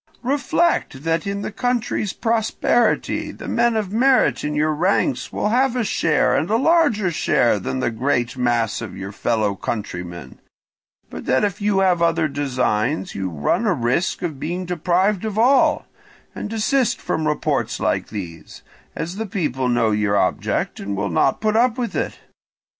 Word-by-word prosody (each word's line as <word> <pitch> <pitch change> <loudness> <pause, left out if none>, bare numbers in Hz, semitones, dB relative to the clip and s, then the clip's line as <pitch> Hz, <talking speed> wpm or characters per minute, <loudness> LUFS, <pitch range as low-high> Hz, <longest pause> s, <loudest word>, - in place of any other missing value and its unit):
Reflect 275 - 0
that 165 +2 0
in 200 0 -3
the - - -4
country's 240 -3 -1
prosperity 230 0 0
the - - -10
men 235 0 +2
of 210 -4 -2
merit 245 - +3
in 150 0 -2
your 155 +1 +1
ranks 150 -6 0
will 210 - -1
have 255 +2 +2
a 245 - +1
share 165 -7 +2
and 160 - 0
a 220 - +2
larger 255 - +3
share 120 -8 +2
than 130 +7 -3
the 120 - 0
great 120 +1 -1
mass 120 -2 0
of 110 - -7
your 95 +1 -6
fellow 110 -1 0
countrymen, 90 -4 -6 0.7
but - - -7
that 130 - +2
if 205 -1 -1
you 200 -1 +2
have 180 -3 +2
other 165 -1 +2
designs 140 - -1
you 95 -1 -3
run 85 - 0
a 200 - +3
risk 130 +10 -1
of 155 -6 -3
being 175 +5 -3
deprived 180 +3 +1
of 215 -2 -3
all; 255 +5 +4 0.5
and - - -5
desist 225 +3 +1
from 155 -1 -2
reports 150 - -1
like - - 0
these, 85 -7 -8 0.3
as 170 +4 -4
the 220 0 -3
people 150 - -1
know 115 -2 +2
your 105 -1 +1
object - - -1
and 100 0 -4
will 100 0 -1
not - - +2
put 215 0 +1
up 240 +1 +3
with 240 -2 -3
it. - - -2
170 Hz, 170 wpm, -21 LUFS, -, 0.7 s, all